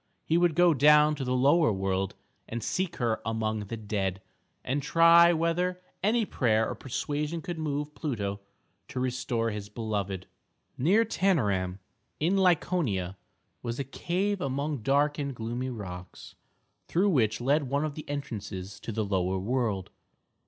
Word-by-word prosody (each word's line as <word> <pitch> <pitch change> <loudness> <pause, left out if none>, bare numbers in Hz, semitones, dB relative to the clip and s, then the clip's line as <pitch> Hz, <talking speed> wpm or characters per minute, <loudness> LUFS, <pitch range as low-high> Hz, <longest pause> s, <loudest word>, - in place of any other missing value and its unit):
He 160 - +1
would 170 -2 +3
go 175 -1 +5
down 150 +2 +6
to 145 -2 -4
the 125 0 0
Lower 140 +2 +4
World 95 -1 -1 0.3
and 115 -1 -4
seek 185 +4 -1
her 115 -3 0
among 110 -1 -2
the 115 - -5
dead, 100 -3 -2 0.4
and 140 +3 -1
try 170 +3 +6
whether 175 +2 0 0.2
any 225 +3 +2
prayer 110 - +1
or - - -3
persuasion 150 +5 -3
could 175 0 -5
move 150 -1 -2
Pluto 105 -11 -3 0.5
to 130 - -5
restore 125 -2 -1
his 105 -1 -6
beloved. 100 -4 -3 0.5
Near 195 - +3
Tænarum, 105 - +1 0.4
in 170 +6 +2
Laconia, 165 - +1 0.5
was 120 0 -4
a 140 - -1
cave 185 +9 -2
among 140 +2 -2
dark 145 +5 +2
and 140 -2 -3
gloomy 120 +3 -3
rocks, 90 -6 -8 0.5
through 190 +4 +2
which 110 - +2
led 140 +2 +1
one 140 +3 +1
of 150 - -3
the 155 0 -9
entrances 105 -9 -5
to - - -6
the 110 0 -1
Lower 95 -1 0
World. 105 -2 -1
130 Hz, 150 wpm, -28 LUFS, 105-160 Hz, 0.5 s, down